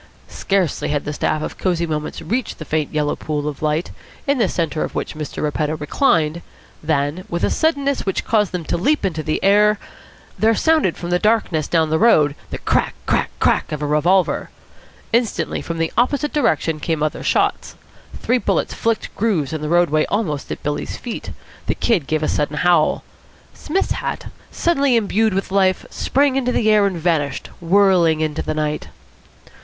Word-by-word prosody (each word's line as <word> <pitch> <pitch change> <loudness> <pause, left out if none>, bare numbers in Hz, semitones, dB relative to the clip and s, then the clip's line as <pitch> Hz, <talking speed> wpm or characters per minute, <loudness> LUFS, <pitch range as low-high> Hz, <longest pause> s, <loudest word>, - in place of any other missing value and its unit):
Scarcely 190 -6 -1
had 145 -1 -1
the 150 - -3
staff 155 +1 -1
of - - -6
Cosy 175 -3 0
Moments 150 -2 -4
reached 240 +1 -2
the 155 - -8
faint 155 -1 -1
yellow 150 -1 0
pool 150 -1 -3
of 145 -2 -5
light, 155 +2 -1 0.3
in 280 -2 +1
the 210 -5 +2
centre 165 -2 -1
of - - -5
which - - -3
Mr. 155 -1 -5
Repetto 150 +1 -1
reclined, 160 - +1 0.4
than, 150 +2 -1
with 170 0 -3
a - - +2
suddenness 280 -3 +1
which 195 - -2
caused 210 -4 +2
them 180 -3 -4
to - - -1
leap 285 - +1
into 165 -4 -1
the 155 0 -1
air, 210 +2 +4 0.6
there 225 +1 +4
sounded 315 - +2
from 175 0 -5
the 180 - +2
darkness 210 -8 +1
down 160 -2 +1
the 160 - +2
road 155 -11 +4 0.2
the - - -4
crack - - 0
crack - - +1
crack - - +2
of 150 -1 -3
a - - 0
revolver. 170 +6 +2 0.6
Instantly 235 -1 0
from 165 - -5
the 165 0 -1
opposite 285 +5 +1
direction 160 - +1
came 155 0 -1
other 155 - -2
shots. - - 0 0.4
Three 250 +1 +1
bullets - - 0
flicked 230 -1 -2
grooves 185 -10 0
in 155 - -3
the 150 - -3
roadway 170 -3 +3
almost 165 -10 -2
at - - -6
Billy's 145 0 -3
feet. 240 - -6 0.4
The - - 0
Kid 190 - +1
gave 155 0 0
a - - +1
sudden 150 0 -1
howl. 175 -3 +3 0.5
Psmith's 380 +6 -2
hat, - - -3 0.2
suddenly 280 -7 +1
imbued 220 -1 +1
with 195 0 -2
life, 190 -1 +2
sprang 275 0 +1
into 250 -2 0
the 220 -3 +2
air 210 -1 +5
and 190 -3 -3
vanished, 160 -4 -1
whirling 175 -3 +3
into 155 0 -1
the 155 - -3
night. 150 0 -2
170 Hz, 180 wpm, -20 LUFS, 155-220 Hz, 0.6 s, air